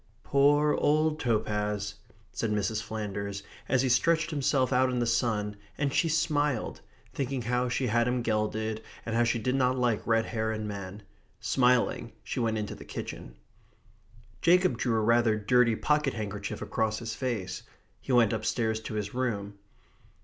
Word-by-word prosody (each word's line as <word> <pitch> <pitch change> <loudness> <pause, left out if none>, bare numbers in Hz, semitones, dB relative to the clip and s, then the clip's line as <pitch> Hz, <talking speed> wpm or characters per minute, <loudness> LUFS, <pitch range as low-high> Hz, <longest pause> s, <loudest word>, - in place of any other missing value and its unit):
"Poor 145 +2 +4
old 155 +1 +2
Topaz," 105 -4 -1 0.4
said 115 - -2
Mrs. 105 +1 0
Flanders, 100 -2 -4 0.3
as 130 0 +3
he - - +2
stretched 165 +6 +2
himself 135 -3 +1
out 130 +1 +4
in 125 - -1
the 120 - +1
sun, 110 -3 0 0.2
and 140 -2 0
she 165 - +2
smiled, 150 -5 0 0.3
thinking 135 -2 -2
how 125 +2 0
she 125 +2 0
had 110 - -1
had 120 0 +3
him 125 -1 0
gelded, 110 0 -1 0.2
and 115 - -2
how 120 - +4
she 115 0 +1
did 125 +3 -1
not 130 -1 +2
like 120 -4 +1
red 115 0 +3
hair 110 -1 -2
in 110 -1 -3
men. 100 0 -7 0.4
Smiling, 125 -2 +2
she - - -4
went 115 -2 0
into 105 -1 -3
the - - -10
kitchen. - - -7 1.1
Jacob 180 -4 +4
drew 115 -3 +1
rather 115 0 +3
a - - -4
dirty 125 -1 +4
pocket 150 +1 +1
handkerchief 105 -2 -4
across 110 -1 -1
his 115 0 -5
face. 110 -9 -3 0.4
He - - -5
went 120 -4 +4
upstairs 110 0 0
to 110 0 -6
his 105 -2 -3
room. 100 -6 -2
115 Hz, 165 wpm, -29 LUFS, 110-130 Hz, 1.1 s, Poor